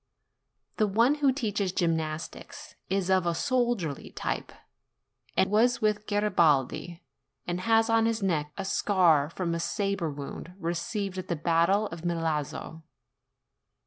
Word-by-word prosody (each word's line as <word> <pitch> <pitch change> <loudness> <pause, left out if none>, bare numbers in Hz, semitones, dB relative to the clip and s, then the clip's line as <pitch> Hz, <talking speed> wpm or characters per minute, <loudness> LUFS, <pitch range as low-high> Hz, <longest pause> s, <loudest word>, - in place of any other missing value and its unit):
The 215 - +3
one 230 +7 +3
who 275 -2 +5
teaches 210 -7 -1
gymnastics 165 - -3 0.2
is 190 -1 0
of 185 -2 +3
a 170 - +1
soldierly 240 - -1
type, - - -4 0.9
and 190 - +4
was 235 +4 +3
with 210 -1 0
Garibaldi, 170 -5 +1 0.4
and 175 0 -2
has 225 +2 +3
on 225 -1 +3
his 230 -2 -1
neck 150 -6 0
a 195 - -3
scar 175 -8 +3
from 170 0 -3
a 170 - -2
sabre 200 -2 -1
wound 145 +5 -8
received 190 +3 -3
at 185 - -6
the 170 - -1
battle 170 +6 +2
of 165 0 -8
Milazzo. 160 -2 -2
185 Hz, 135 wpm, -28 LUFS, 165-215 Hz, 0.9 s, who